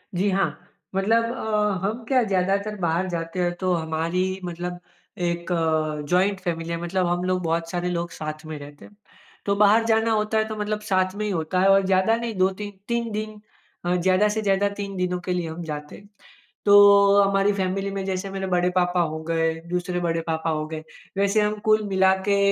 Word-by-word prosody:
जी, 200 +3 +1
हाँ। 195 0 0 0.4
मतलब 225 +4 +3
अ, 210 -4 -1
हम 225 +3 -3
क्या 260 -2 +3
ज़्यादातर 200 +1 0
बाहर 170 +2 0
जाते 165 +1 -4
हैं, 175 0 +1
तो 185 -1 +1
हमारी 170 +4 -1
मतलब 175 +1 -5 0.5
एक 170 0 -3 0.6
जॉइंट 190 +2 +2
फ़ैमिली 170 -3 -3
है, 170 - -2
मतलब 180 +1 0
हम 175 +1 0
लोग 185 0 0
बहुत 165 0 -1
सारे 180 0 -2
लोग 170 -1 -2
साथ 155 0 -6
में 155 -1 -6
रहते 145 0 -12
हैं। 205 - -17 0.5
तो 200 - +1
बाहर 210 +2 +5
जाना 225 0 +2
होता 215 0 +1
है, 220 - +2
तो 220 - -5
मतलब 210 0 -2
साथ 185 0 +2
में 215 - -3
ही 210 - -1
होता 170 +1 -1
है 195 - +4
और 195 0 +5
ज़्यादा 190 +4 +3
नहीं 230 -1 -3
2-3, 195 +2 0 0.2
3 235 -1 -1
दिन 215 0 -5 0.5
अ, 175 +1 +1
ज़्यादा 185 +3 +3
से 220 +1 -1
ज़्यादा 200 -1 +2
3 200 -1 -4
दिनों 180 0 -1
के 180 - 0
लिए 175 -2 -2
हम 165 +2 -7
जाते 150 -2 -6
हैं। 200 - -15 0.6
तो 200 0 +7
हमारी 195 +1 +3
फ़ैमिली 195 0 -1
में 195 - -2
जैसे 190 +1 -3
मेरे 195 0 -3
बड़े 180 0 +2
पापा 180 0 +2
हो 160 - -4
गए, 165 0 0 0.2
दूसरे 180 0 -2
बड़े 165 0 0
पापा 160 0 -1
हो 155 -1 -1
गए, 155 0 -6 0.3
वैसे 200 +2 +2
हम 210 0 +1 0.2
कुल 215 0 +4
मिला 190 0 +3
के 200 - +4
190 Hz, 205 wpm, -24 LUFS, 175-205 Hz, 0.6 s, तो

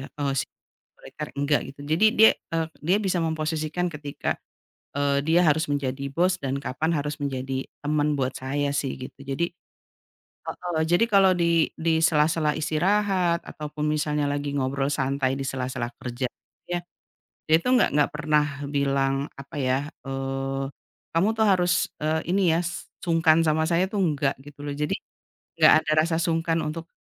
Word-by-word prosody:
Eee, 145 -2 -1 0.6
otoriter, - - -8
nggak, 145 +1 +1
gitu. 140 - -26
Jadi 160 +8 +3
dia, 220 +1 +8 0.2
eee, 165 -1 0 0.2
dia 180 +6 +3
bisa 190 -4 0
memposisikan 160 +2 -1
ketika, 145 -2 -3 0.6
eee, 140 0 +2
dia 165 +3 +4
harus 155 +1 +3
menjadi 140 -1 -2
bos 180 +4 +2
dan 135 0 -1
kapan 155 +5 -1
harus 150 +1 -3
menjadi 135 -1 -3 0.2
teman 150 0 +1
buat 130 -1 -1
saya 140 +2 -1
sih, 140 -2 -2
gitu. 130 +1 -9
Jadi, 140 +5 -2 1.0
heeh, 175 -3 -3
jadi 175 +7 +3
kalau 195 -2 +5
di 170 -2 +2
di 160 0 +1
sela-sela 155 -1 +3
istirahat 180 +2 +1
ataupun 150 0 -5
misalnya 150 -1 0
lagi 145 0 -2
ngobrol 135 +1 0
santai 135 -1 0
di - - -2
sela-sela 130 -2 -3
kerja, 125 +1 -3 0.4
ya, 175 0 0 0.7
dia 155 - +6
itu 170 - -5
enggak 255 - +4
enggak 145 0 +3
pernah 150 0 +2 0.2
bilang, 140 -1 +1
apa 140 +1 -11
ya, 130 -1 +1 0.3
eee, 135 0 -2 0.5
"Kamu 170 +6 +3
tuh 220 - +3
harus, 180 -2 +2
eee, 155 +1 0
ini 190 -3 +3
ya, 170 - +2 0.4
sungkan 165 -2 +4
sama 160 0 +2
saya, 170 +2 +2
tuh 205 - -1
enggak", 145 -6 +1
gitu 145 0 -12
loh. 145 - -4
Jadi 150 +1 -1 0.7
enggak - - +8
ada 155 - 0
rasa 165 -1 0
sungkan 165 0 +1
untuk, 165 +2 -5
150 Hz, 155 wpm, -25 LUFS, 140-165 Hz, 1.0 s, dia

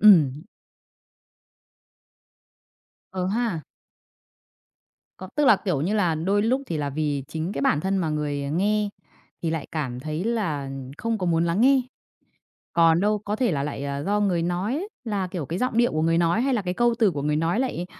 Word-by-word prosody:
Ừm. 155 -8 +6 2.7
Ờ 185 -1 -2
ha! 215 -4 -1 1.6
Có, 185 - -8
tức 295 - +3
là, 215 - +7
kiểu 185 -7 -1
như 190 +8 0
là, 180 -6 +2
đôi 195 +6 +1
lúc 255 +5 +1
thì 165 - -2
là 145 -2 -2
vì 145 -1 -1
chính 160 +4 -3
cái 140 - -3
bản 145 +1 +3
thân 195 +2 0
mà 170 -4 0
người, 145 -2 -2
ờ, 140 - -3
nghe 205 +5 +1 0.5
thì 165 - 0
lại 160 -3 -3
cảm 130 -6 -3
thấy 155 +6 -3
là 165 -13 -1 0.3
không 230 0 -1
có 185 - -2
muốn 165 -1 +2
lắng 170 +5 0
nghe. 265 +1 +5 0.9
Còn 165 0 +4
đâu 210 +1 +2
có 210 +1 -3
thể 235 -7 +1
là 140 - -1
lại, 140 -1 -4
ờ, 140 0 -3
do 205 +3 +1
người 185 -5 +1
nói 205 - -1 0.2
là, 205 -5 -1
kiểu, 180 -5 -5
cái 170 +6 -3
giọng 250 -2 -1
điệu 240 0 +3
của 155 0 0
người 165 +1 +3
nói 170 +5 +2
hay 265 +1 +1
là 220 - 0
cái 180 -1 -2
câu 240 +3 +3
từ 220 -4 +4
của 145 -5 -4
người 150 0 +1
nói 165 +8 +1
lại 215 -9 -2
180 Hz, 195 wpm, -25 LUFS, 155-210 Hz, 2.7 s, là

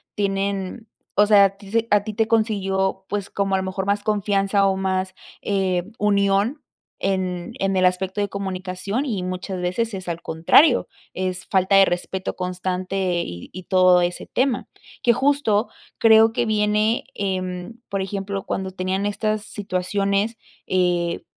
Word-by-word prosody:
tienen, 200 +2 -2 0.3
o 205 - +5
sea, 205 -1 +6
a 195 - +3
ti 200 -1 -13
se 230 +1 +1
a 205 -1 +4
ti 215 - -4
te 220 +1 +1
consiguió, 195 -4 0
pues, 200 -1 -3
como 195 -1 0
a - - +2
lo 190 - -1
mejor 190 0 -3
más 205 +1 0
confianza 200 -1 +1
o 190 -1 +1
más, 190 0 -1 0.3
eh, 190 -3 0 0.2
unión 200 +6 +2 0.4
en 185 -2 -2
en 195 0 0
el 185 0 +3
aspecto 185 +2 0
de 205 - -1
comunicación 190 +4 -3
y 215 -9 -2
muchas 185 +1 -4
veces 220 +6 -1
es 190 -2 -6
al 170 -1 -3
contrario, 175 - +4 0.3
es 185 -1 -3
falta 190 -1 +2
de 195 - +8
respeto 185 +1 -2
constante 185 0 -2
y 85 0 -8
y 185 - -8
todo 185 -1 +5
ese 175 0 -2
tema, 260 -1 0 0.3
que 240 - +5
justo 250 -5 +2 0.3
creo 225 -1 +6
que 240 +1 0
viene, 215 +1 +1
em, 185 0 -3 0.2
por 195 -1 -1
ejemplo, 195 0 -4
cuando 190 0 -3
tenían 185 +2 -2
estas 215 +1 -1
situaciones, 200 +2 -1 0.3
eh, 175 -2 0
195 Hz, 155 wpm, -22 LUFS, 185-210 Hz, 0.4 s, de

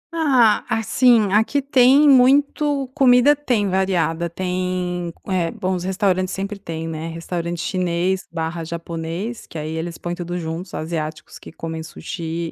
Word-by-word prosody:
Ah, 260 -9 +4
assim, 225 -2 +3
aqui 220 +7 +3
tem 275 +1 +5
muito 280 +1 +4
comida 265 0 +5
tem 245 -8 0
variada. 180 -3 0
Tem 180 -1 -2 0.2
eh, 180 -4 0
bom 185 0 -3
os 180 -1 -3
restaurantes 185 -1 0
sempre 200 +1 -4
têm, 165 -3 -5
né. 160 0 -5
Restaurante 170 +1 -4
chinês 180 +1 0
barra 165 0 -3
japonês, 170 +6 -5
que - - -9
aí 155 0 -4
eles 165 +1 -4
põem 175 - -4
tudo 175 0 -4
juntos, 170 +2 -5
asiáticos 155 -1 -5
que - - -12
comem 160 0 -6
sushi 165 0 -5
180 Hz, 145 wpm, -21 LUFS, 165-225 Hz, 0.2 s, tem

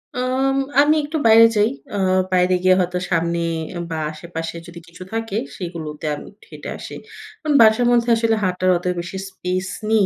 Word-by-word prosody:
আম 260 +2 0 0.3
আমি 300 +1 +4
একটু 305 +2 -3
বাইরে 225 +1 +8
যাই। 210 +1 +3 0.3
আ - - -1 0.4
বাইরে 180 0 +3
গিয়ে 185 0 +5
হয়তো 180 0 -1
সামনে, 170 0 0 0.5
বা 160 - -3
আশেপাশে 165 +1 -7
যদি 170 0 -10
কিছু 170 +2 -11
থাকে, 225 -2 -3 0.2
সেগুলোতে 160 -4 -6
আমি - - -10
একটু 205 - -23
হেঁটে - - -8
আসি। - - -9 0.5
কারন 305 -2 0
বাসার 220 +2 +5
মধ্যে 240 0 +2
আসলে 225 -1 +1
হাঁটার 185 0 0
অত 175 - -10
বেশি 170 +2 -6
স্পেস 185 0 -3 0.2
নেই, 220 -3 +4
185 Hz, 175 wpm, -20 LUFS, 170-225 Hz, 0.5 s, বাইরে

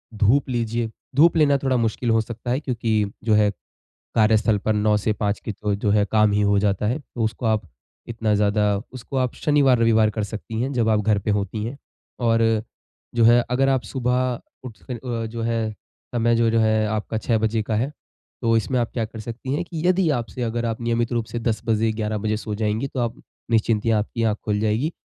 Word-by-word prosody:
धूप 120 +7 +3
लीजिए। 115 -1 -1 0.3
धूप 165 +4 +5
लेना 145 -2 +4
थोड़ा 130 -1 +2
मुश्किल 115 +1 -1
हो 115 0 +4
सकता 120 +2 -5
है 130 - +1
क्योंकि 115 -6 0 0.2
जो 110 - +2
है 105 -1 +4 0.7
कार्यस्थल 110 -1 +3
पर 110 - +4
9 105 0 +2
से 105 +1 0
5 105 -1 -2
के - - -3
जो 105 0 -2
जो 100 0 0
है 105 0 +4
काम 105 -1 +4
ही 105 - +2
हो 100 0 +3
जाता 100 0 +1
है। 125 +7 0
तो 120 -5 -7
उसको 110 +2 -2
आप 110 -1 +2 0.5
इतना 110 -2 0
ज़्यादा 105 0 +2 0.2
उसको 130 +2 -7
आप 125 -2 0
शनिवार, 145 -5 +3
रविवार 110 -2 +4
कर 110 0 -3
सकती 110 +2 -5
हैं 135 +2 -2
जब 115 -3 +1
आप 110 -1 +3
घर 105 0 +2
पे 100 - -2
होती 105 +1 -1
हैं। 120 +5 -5 0.4
और 115 -2 +2 0.5
जो 115 -1 +3
है 120 +1 +6
अगर 135 +2 +2
आप 135 -2 +2
सुबह 125 +1 -1 0.2
उठ 120 -4 -8
के - - -1
अ, 120 -1 -4
जो 115 +1 -5
है 115 -1 -1 0.4
समय 120 0 +2
जो 115 0 +3
जो 115 - +2
है 110 0 +2
आपका 110 +1 -2
6 110 0 +1
बजे 110 0 0
का 110 +1 -3
है। 125 +6 0 0.5
तो 115 -1 +3
इसमें 125 +3 0
आप 120 - -1
क्या 115 - 0
कर 110 0 -8
सकती 120 +4 -5
हैं 160 - 0
कि 170 -1 -4
यदि 185 -1 +3
आपसे 120 -1 -3
अगर 120 0 -2
आप 115 0 -3
नियमित 115 +1 0
रूप 115 -1 0
से 120 - -4
10 115 -1 -1
बजे, 110 0 +2
11 110 -1 -2
बजे 110 +1 -1
सो 105 -1 -5
जाएँगी 110 +4 -1
तो 135 - -4
आप 120 -1 -1 0.4
निश्चिंतियाँ 110 -1 +2
आपकी 115 +2 -3
आँख 105 -1 +1
खुल 105 -1 0
जाएगी। 110 +9 0
115 Hz, 220 wpm, -23 LUFS, 110-120 Hz, 0.7 s, है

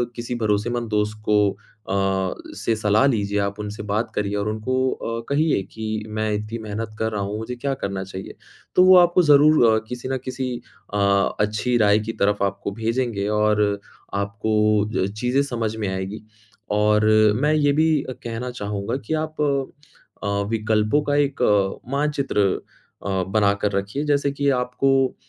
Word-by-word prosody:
किसी 120 +1 -4
भरोसेमंद 115 +2 -1
दोस्त 105 0 0
को 105 -1 +4
अ, 105 0 -10 0.7
से 115 - 0
सलाह 105 +3 +3
लीजिए, 105 -5 0
आप 100 +1 -2
उनसे 105 0 -5
बात 105 +3 -2
करिए 105 0 -1
और 100 +1 -2
उनको 130 +4 0
अ, 115 0 -4
कहिए 145 -5 +2
कि 110 -1 -3
मैं 110 0 -2
इतनी 105 +2 -3
मेहनत 110 +1 -5
कर 110 0 0
रहा 105 - -2
हूँ, 100 +2 -3
मुझे 110 +3 -5
क्या 135 +3 -2
करना 100 -5 -4
चाहिए? 95 0 -8 0.4
तो 180 - +7
वो 185 0 +8
आपको 175 0 +5
ज़रूर 150 -2 +6
अ, - - +3
किसी 125 +1 -5
न 135 - 0
किसी 130 0 -3 0.4
अ, 105 - 0 0.4
अच्छी 110 +4 +1
राय 105 -1 +4
की 110 +1 -4
तरफ़ 100 0 +2
आपको 100 +1 -3
भेजेंगे 115 -1 -1
और 105 0 +3 0.5
आपको 100 +2 -2 0.5
अ, - - -1
चीज़ें 125 +4 +2
समझ 115 -5 -3
में 105 -3 -2
आएँगी। 95 +3 -5 0.5
और 105 0 +3 0.3
मैं 150 +5 +2
ये 145 -2 +3
भी 160 - +3 0.3
कहना 120 +2 -4
चाहूँगा 105 0 -3
कि - - -1
आप 155 -1 -7 0.8
अ, - - -2 0.2
विकल्पों 110 +4 +1
का 145 0 0
एक 145 -2 0 0.5
मानचित्र 140 -5 0 0.6
अ, 95 -2 0
बना 100 0 +3
कर 105 - +1
रखिए। 100 +8 -2
जैसे 140 -1 +1
की 140 0 0
आपको 130 +1 +1
110 Hz, 165 wpm, -22 LUFS, 105-130 Hz, 0.8 s, वो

